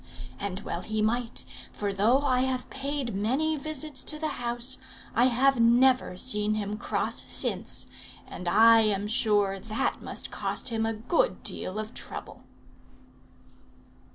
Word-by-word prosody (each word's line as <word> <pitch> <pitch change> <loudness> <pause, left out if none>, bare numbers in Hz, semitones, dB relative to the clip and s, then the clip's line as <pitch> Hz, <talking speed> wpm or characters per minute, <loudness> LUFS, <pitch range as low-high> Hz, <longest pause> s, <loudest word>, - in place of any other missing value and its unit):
And 200 -1 -4
well 170 - -4
he 215 +2 -3
might; 235 +2 -1 0.3
for 205 -1 -3
though 225 +8 +3
I 255 -3 +2
have 255 -1 -1
paid 275 -3 -3
many 260 +11 +1
visits 305 -1 -4
to 305 - +2
the 300 -4 -3
house, 240 +2 -1 0.3
I 240 - +4
have 260 +1 +3
never 245 -3 +4
seen 210 -2 0
him 210 -1 -3
cross 220 - -2
since; - - +1 0.4
and 180 - -7
I 225 +5 +7
am 205 -2 +2
sure 205 -3 +1
that 220 +2 -1
must - - -5
cost - - -2
him 225 -1 0
a 225 - 0
good 345 - 0
deal 185 - -4
of 215 +2 -5
trouble." - - -7
230 Hz, 145 wpm, -28 LUFS, 210-265 Hz, 0.4 s, I